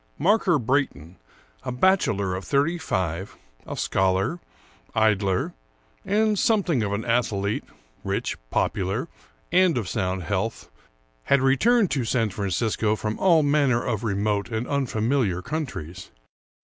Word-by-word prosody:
Marker 185 0 +3
Brayton, 115 - -1 0.4
a - - -4
bachelor 125 - +2
of 95 +1 -4
thirty 145 - +1
five, 95 - -3 0.3
a - - -5
scholar, 95 - +1 0.6
idler, 100 -4 +1 0.5
and 210 +1 +1
something 190 - +2
of 100 -2 -1
an 100 +2 -2
athlete, 110 -4 0 0.4
rich, - - -2
popular, 105 - -1 0.4
and 180 -3 +4
of 110 -6 -2
sound 95 -3 -2
health, 105 +4 -3 0.5
had 140 - +4
returned 195 - +3
to 135 - 0
San 115 -2 0
Francisco 105 +3 0
from 110 0 -4
all 170 -5 +4
manner 140 -5 +2
of 110 -3 -2
remote 100 -1 -1
and 110 +1 -3
unfamiliar 120 -7 0
countries. 120 - -5
115 Hz, 125 wpm, -24 LUFS, 100-145 Hz, 0.6 s, and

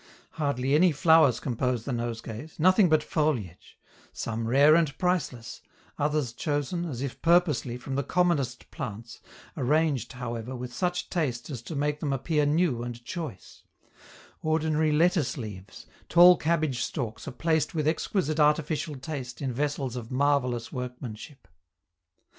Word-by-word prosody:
Hardly 140 -3 -1
any 175 +4 +5
flowers 160 -4 +4
compose 125 -2 -2
the 140 - -3
nosegays, 115 +4 -5
nothing 185 +3 +5
but 155 -1 +3
foliage 130 - -2 0.3
some 115 0 -4
rare 140 +5 +6
and 155 -4 +2
priceless, 135 -11 -2 0.4
others 145 -4 0
chosen, 145 +6 -2
as 135 -6 -4
if 140 - -6
purposely, 155 -9 +2
from 135 +2 -7
the 140 - +1
commonest 140 -6 0
plants, 115 -6 -7 0.3
arranged, 140 -2 +1
however, 120 0 -5
with 125 0 -6
such 180 +5 -2
taste 150 -6 -2
as 125 -5 -5
to 120 +7 -7
make 150 +1 -1
them 145 -3 -1
appear 150 +2 +1
new 150 -5 +1
and 120 0 -7
choice; 160 - -7 0.8
ordinary 155 0 +1
lettuce 165 -1 +2
leaves, 105 -6 -8 0.2
tall 175 +1 +8
cabbage 155 -6 0
stalks 120 -1 -4
are - - -3
placed 160 +4 0
with 155 -2 0
exquisite 160 -1 0
artificial 150 0 +1
taste 130 -3 -6
in 130 -3 -2
vessels 140 -1 -2
of 120 -2 -6
marvellous 130 -3 0
workmanship. 125 0 -7
145 Hz, 140 wpm, -27 LUFS, 125-160 Hz, 0.8 s, tall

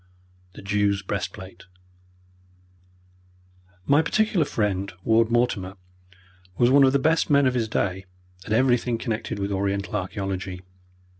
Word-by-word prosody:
The - - -12
Jew's 100 0 0
Breastplate 95 -2 -6 2.2
My 145 +6 +4
particular 200 -1 +1
friend, 100 -5 -2
Ward 115 0 +3
Mortimer, 115 -6 0 0.8
was 120 +1 +4
one 140 +1 +6
of 130 - +4
the - - +4
best 160 +5 +1
men 140 -1 +4
of 130 - +2
his 120 -3 -1
day 95 -2 -2 0.4
at 105 - -9
everything 120 0 +2
connected 115 -2 -4
with 100 0 -3
Oriental 100 0 -2
archaeology. 95 -1 -4
105 Hz, 125 wpm, -24 LUFS, 95-125 Hz, 2.2 s, one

